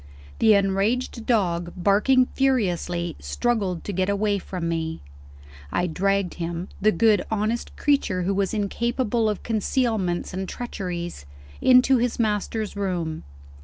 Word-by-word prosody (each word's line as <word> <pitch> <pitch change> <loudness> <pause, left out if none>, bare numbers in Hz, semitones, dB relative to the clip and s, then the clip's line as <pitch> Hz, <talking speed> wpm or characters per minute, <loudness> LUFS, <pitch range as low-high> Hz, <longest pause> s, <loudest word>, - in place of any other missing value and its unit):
The 220 -2 +6
enraged 205 +5 0
dog, 175 -7 +1
barking 210 +8 +4
furiously, 180 -10 0
struggled 185 - -1
to 205 - -4
get 185 +1 0
away 200 0 +1
from 180 -2 -5
me. 160 -1 -2 0.7
I 175 - +1
dragged 195 +2 0
him 170 +2 -4
the 215 +2 +5
good 215 -3 +3
honest 220 +2 -2
creature 275 -11 +1
who 195 +3 0
was 195 -1 0
incapable 230 +2 0
of 210 - -3
concealments 220 -6 0
and 190 0 -4
treacheries! 175 - -5 0.3
into 255 +1 +6
his 245 0 0
master's 215 -1 -1
room. 175 - -3
200 Hz, 130 wpm, -24 LUFS, 180-230 Hz, 0.7 s, The